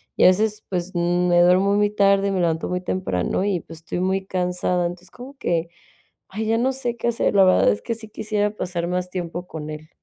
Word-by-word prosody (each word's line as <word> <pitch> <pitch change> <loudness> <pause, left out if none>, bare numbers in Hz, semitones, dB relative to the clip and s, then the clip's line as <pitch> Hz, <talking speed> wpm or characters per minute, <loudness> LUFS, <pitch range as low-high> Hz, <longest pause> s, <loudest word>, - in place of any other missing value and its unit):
Y - - +2
a - - +9
veces, 210 +3 +2
pues, 180 -1 -3
me 175 0 +2
duermo 185 +3 +4
muy 205 0 +3
tarde, 200 -1 +3
me 190 - -1
levanto 165 -2 0
muy 180 0 -2
temprano 180 - -1
y, 195 -3 0
pues, 165 +1 -12
estoy 165 +2 -5
muy 190 +1 0
cansada. 180 -1 0
Entonces, 175 +1 -6
como 265 +3 -11
que: 170 -8 -1 0.6
"Ay, 215 +3 -4
ya 225 +1 +2
no 255 +3 +1
sé 245 -2 -3
qué 235 - -2
hacer". 235 -3 0
La 195 - +7
verdad 185 - +5
es 100 - -3
que 230 - -3
sí 220 -1 -9
quisiera 210 -1 -1
pasar 175 -3 -3
más 180 0 -2
tiempo 175 -1 -5
con 155 -3 -7
él. 155 0 -8
185 Hz, 220 wpm, -22 LUFS, 175-205 Hz, 0.6 s, a